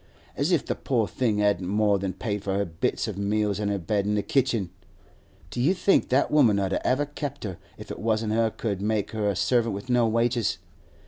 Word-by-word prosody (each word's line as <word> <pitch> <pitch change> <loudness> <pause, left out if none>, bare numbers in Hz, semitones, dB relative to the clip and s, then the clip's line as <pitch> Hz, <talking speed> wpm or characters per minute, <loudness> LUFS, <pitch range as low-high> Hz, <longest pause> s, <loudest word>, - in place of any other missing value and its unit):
As 145 +7 0
if 170 -5 +2
the - - -1
poor 115 -6 0
thing 115 -2 0
hadn't 100 -3 +1
more 105 0 +2
than 95 -1 -3
paid 100 +1 -3
for 95 -1 -1
her 100 - +1
bits 80 -1 -2
of 100 - -5
meals 105 0 0
an' 105 -1 -1
her 100 - 0
bed 100 +3 -1
in 105 - +1
the 105 - 0
kitchen! 120 -9 0 0.8
Do 120 - -3
you 165 +9 +3
think 195 +2 +2
that 130 +3 +2
woman 125 -9 +5
'ud 95 -1 0
ever 135 +3 +1
have 145 - -22
kept 145 -3 -5
her 95 -5 -5 0.2
if - - -9
it - - -6
wasn't 110 -1 0
she 115 0 +2
could 100 -4 -2
make 105 -1 -1
her 105 -2 0
a 100 - -1
servant 115 +1 +1
with 100 +6 -5
no 120 -2 +4
wages? 115 +1 +1
110 Hz, 230 wpm, -26 LUFS, 100-120 Hz, 0.8 s, woman